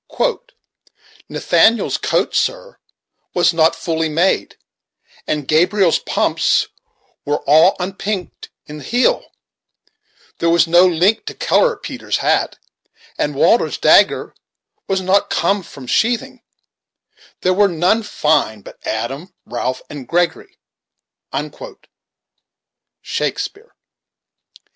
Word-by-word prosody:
CHAPTER -, -, -3 dB, 0.3 s
V -, -, -29 dB, 0.4 s
"Nathaniel's 225 Hz, +1 st, +2 dB
coat, -, -, -1 dB
sir, -, -, -2 dB, 0.6 s
was 175 Hz, -1 st, +3 dB
not 160 Hz, 0 st, +3 dB
fully 160 Hz, -1 st, -2 dB
made, 170 Hz, +5 st, 0 dB, 0.7 s
And 150 Hz, -3 st, -2 dB
Gabriel's 180 Hz, +3 st, +3 dB
pumps -, -, 0 dB, 0.5 s
were 145 Hz, +1 st, -2 dB
all 160 Hz, +6 st, +5 dB
unpink'd 195 Hz, 0 st, -5 dB, 0.2 s
i' 150 Hz, -, -9 dB
th' 145 Hz, -, -11 dB
heel; 245 Hz, +2 st, +1 dB, 1.1 s
There 170 Hz, -, +1 dB
was 170 Hz, 0 st, +4 dB
no 175 Hz, +2 st, +5 dB
link 185 Hz, -, +1 dB
to 435 Hz, -, -6 dB
color 485 Hz, -2 st, +2 dB
Peter's -, -, -4 dB
hat, -, -, 0 dB, 0.6 s
And -, -, -1 dB
Walter's -, -, +2 dB
dagger -, -, +3 dB, 0.5 s
was 190 Hz, -1 st, 0 dB
not 190 Hz, +2 st, +1 dB
come 200 Hz, 0 st, +1 dB
from 140 Hz, -6 st, -12 dB
sheathing; 230 Hz, -, -1 dB, 1.0 s
There 185 Hz, -, +2 dB
were 200 Hz, +2 st, +4 dB
none 180 Hz, +5 st, +1 dB
fine, 150 Hz, -, 0 dB
but -, -, -14 dB
Adam, 135 Hz, +11 st, -5 dB
Ralph, 125 Hz, +1 st, -4 dB
and 140 Hz, -4 st, -9 dB
Gregory." 170 Hz, -1 st, -1 dB, 2.5 s
Shakespeare. 440 Hz, +4 st, -4 dB
180 Hz, 105 wpm, -18 LUFS, 160-205 Hz, 2.5 s, all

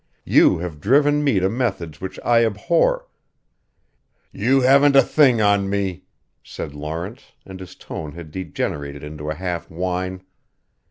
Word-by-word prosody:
You -, -, +5 dB
have 80 Hz, -3 st, -6 dB
driven 145 Hz, -, +3 dB
me 135 Hz, -9 st, +2 dB
to 95 Hz, -, +1 dB
methods 95 Hz, -, -3 dB
which 95 Hz, 0 st, -6 dB
I 115 Hz, -1 st, +4 dB
abhor 170 Hz, -, +1 dB, 0.7 s
" -, -, -46 dB, 0.2 s
"You 135 Hz, +1 st, +4 dB
haven't 140 Hz, +2 st, +5 dB
a 135 Hz, -, +8 dB
thing 130 Hz, -7 st, +3 dB
on 100 Hz, -2 st, +2 dB
me," 100 Hz, -3 st, -2 dB, 0.4 s
said 70 Hz, -, -8 dB
Lawrence 80 Hz, -, -7 dB
and 95 Hz, -1 st, -10 dB
his 95 Hz, -2 st, -11 dB
tone 75 Hz, -2 st, -8 dB
had 85 Hz, -2 st, -10 dB
degenerated 75 Hz, -5 st, -5 dB
into 75 Hz, 0 st, -7 dB
a 80 Hz, -, -2 dB
half 90 Hz, 0 st, -4 dB
whine. 90 Hz, +2 st, -3 dB
95 Hz, 150 wpm, -21 LUFS, 85-125 Hz, 0.7 s, a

